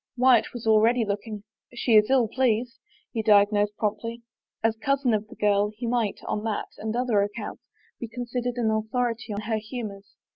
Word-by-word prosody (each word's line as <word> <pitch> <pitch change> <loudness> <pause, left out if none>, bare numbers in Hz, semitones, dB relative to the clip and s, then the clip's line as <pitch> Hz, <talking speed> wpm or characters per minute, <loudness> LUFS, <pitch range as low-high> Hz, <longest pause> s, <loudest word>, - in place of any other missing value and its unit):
Wyatt 250 -2 +4
was 240 -2 -8
already 225 +2 +4
looking. 205 +1 -4 0.2
" - - -32
She 240 - -1
is 210 +1 +6
ill 260 -4 +4
pleased," 245 0 0 0.3
he 225 - -1
diagnosed 205 -1 +3
promptly. 230 +2 -3 0.4
As 225 0 +2
cousin 270 +1 +1
of 215 0 -1
the - - -13
girl, 205 0 +2
he 240 - -4
might, 230 -3 0
on 210 - -2
that 220 -2 -2
and 220 +1 -3
other 240 -4 +2
accounts, 205 +2 -4 0.4
be 235 - -5
considered 245 +1 -4
an 225 -2 +1
authority 225 +1 -1
on 205 0 -3
her 220 +1 -1
humors. 215 -3 -7
225 Hz, 180 wpm, -26 LUFS, 210-240 Hz, 0.4 s, is